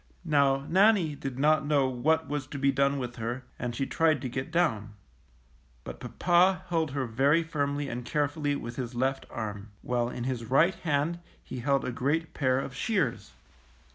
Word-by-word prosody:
Now 140 -3 +2
Nannie 190 -3 +4
did 135 -2 -6
not 155 +2 +3
know 140 -3 +3
what 155 +6 +1
was 145 -2 -3
to 145 - -7
be 140 0 +3
done 140 +1 +2
with 120 -2 -5
her, 120 +3 -4 0.2
and 120 -1 -3
she 135 - -1
tried 160 -1 +2
to 130 - -2
get 130 +4 -4
down; 110 -12 0 0.9
but - - -8
papa 180 +2 +2
held 165 -3 +1
her 135 -1 -2
very 140 +8 +2
firmly 145 -2 -2
and 125 +1 -4
carefully 145 +1 -1
with 120 -3 -6
his 125 -2 -4
left 135 +2 -1
arm, 105 -3 -5
while 120 -1 0
in 120 - -5
his 125 -2 -3
right 145 +10 +4
hand 160 +1 -1 0.2
he - - -7
held 135 +2 +1
a - - -2
great 150 +7 -1
pair 130 -3 +1
of 135 - -5
shears. 150 - -1
140 Hz, 180 wpm, -28 LUFS, 125-155 Hz, 0.9 s, Nannie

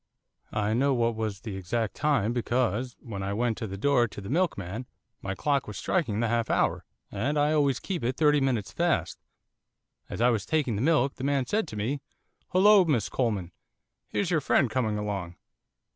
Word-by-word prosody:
I 105 0 +1
know 135 +3 +2
what 115 -1 +1
was 110 -2 -3
the 110 -4 -6
exact 110 +4 -2
time 135 -7 +1
because, 125 +1 0
when 100 -5 -6
I 100 +1 -2
went 115 +1 0
to 110 - -3
the 95 0 -6
door 125 +1 +3
to 105 - -9
the 100 +3 -7
milkman, 125 - -1 0.3
my 95 0 -3
clock 140 +2 0
was 105 - -6
striking 130 - 0
the 115 - +1
half 115 0 0
hour, - - +1 0.3
and 130 +9 -1
I 150 +1 +3
always 140 -3 +2
keep 180 -9 -4
it 125 +2 -1
thirty 150 -2 +4
minutes 125 -7 0
fast. - - 0 0.9
As - - -5
I 120 +1 +4
was 110 -4 0
taking 145 -4 0
the 100 - -2
milk, 140 -2 +2
the 130 - -6
man 140 -2 +1
said 210 - 0
to 110 - -8
me, 130 +7 -2 0.5
"Hollo, 200 +2 +6
Miss 140 -9 +1
Coleman, 105 -9 -1 0.6
here's 190 -3 -1
your 160 -3 +2
friend 130 -3 +2
coming 110 -4 0
along." 100 -5 -4
120 Hz, 190 wpm, -27 LUFS, 105-145 Hz, 0.9 s, Hollo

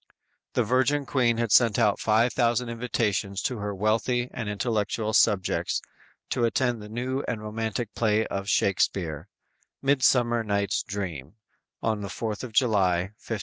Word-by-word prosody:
The 120 - +2
Virgin 130 +5 +1
Queen 120 -4 +1
had 115 -2 -1
sent 115 -2 +5
out 105 - +2
five 115 +3 +2
thousand 120 -1 +1
invitations 110 -4 -1
to 125 -4 -2
her 100 0 -3
wealthy 115 +5 0
and 110 -3 -4
intellectual 110 0 -1
subjects 105 -4 +2 0.5
to 120 - 0
attend 120 0 +1
the 105 - -9
new 130 +4 -2
and 115 - -2
romantic 110 +1 -4
play 110 -1 +1
of 100 +1 -4
Shakspere, 90 -6 0 0.5
"Midsummer 125 -4 +3
Night's 100 -2 0
Dream," 90 -5 -6 0.5
on 110 -2 0
the 100 - -4
4th 105 +3 -4
of 125 - -6
July, 100 -5 +2 0.2
1599. 115 -2 -1
110 Hz, 150 wpm, -26 LUFS, 100-120 Hz, 0.5 s, sent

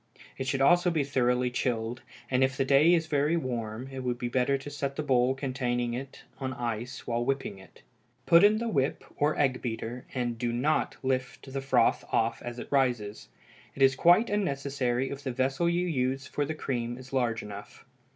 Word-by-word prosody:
It 130 - -4
should 135 0 0
also 175 +4 +5
be 160 -4 +1
thoroughly 125 -2 +1
chilled, 120 -1 -2 0.3
and 130 0 +3
if 130 0 +1
the 135 - +1
day 140 +5 +5
is 165 -2 +3
very 150 +1 +1
warm 120 -4 -4
it 135 - -6
would 125 -1 -2
be 120 0 -3
better 130 +2 +2
to 140 +2 -8
set 140 -1 -3
the 155 - -2
bowl 130 -2 +2
containing 125 -3 -2
it 135 +2 -7 0.2
on 130 -1 -3
ice 120 0 -4
while 120 0 -1
whipping 135 -7 -2
it. 95 -3 -17 0.4
Put 170 +2 +6
in 210 +1 +6
the 235 +1 -2
whip, 140 -9 0
or 150 +1 +1
egg 130 -3 +1
beater, 120 +1 -5
and 120 -2 -2
do 120 -1 0
not 135 +6 0
lift 130 0 -2
the 135 - -2
froth 130 -4 +2
off 115 0 +1
as 120 0 -6
it - - -8
rises; 120 -7 0 0.5
it 135 - +1
is 135 -1 +5
quite 175 - +5
unnecessary 140 -9 -1
if 140 0 -6
the 130 - -2
vessel 135 +7 +1
you 175 +1 +1
use 135 -4 -1
for 145 - -2
the 155 +2 -4
cream 120 -4 -3
is 130 +1 -12
large 120 -3 0
enough. 105 0 -10
130 Hz, 200 wpm, -28 LUFS, 120-140 Hz, 0.5 s, Put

